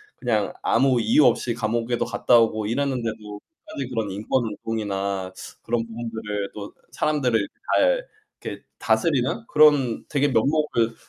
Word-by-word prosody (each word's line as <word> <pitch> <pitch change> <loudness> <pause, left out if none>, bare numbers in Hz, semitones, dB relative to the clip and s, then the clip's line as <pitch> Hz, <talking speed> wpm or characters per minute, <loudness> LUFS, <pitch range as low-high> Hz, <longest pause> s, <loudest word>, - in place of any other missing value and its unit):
그냥 110 -5 -1
아무 130 +1 +3
이유 115 +7 +4
없이 120 0 +2
감옥에도 115 +1 -1
갔다 120 +2 +3
오고 110 -2 +1
이랬는데도 115 -5 -3 0.3
끝까지 135 -2 -5
그런 110 -5 -2
인권 110 +6 -1
운동이나 100 -3 -3 0.3
그런 115 0 -1
부분들을 110 -3 -5
또 105 -1 -8 0.2
사람들을 125 -9 +1 0.3
잘 - - +2 0.4
이렇게 - - -6 0.2
다스리는 130 -8 +1
그런 145 -6 +4
되게 145 0 +1
면목을 125 -2 +1
115 Hz, 315 characters per minute, -23 LUFS, 110-130 Hz, 0.4 s, 이유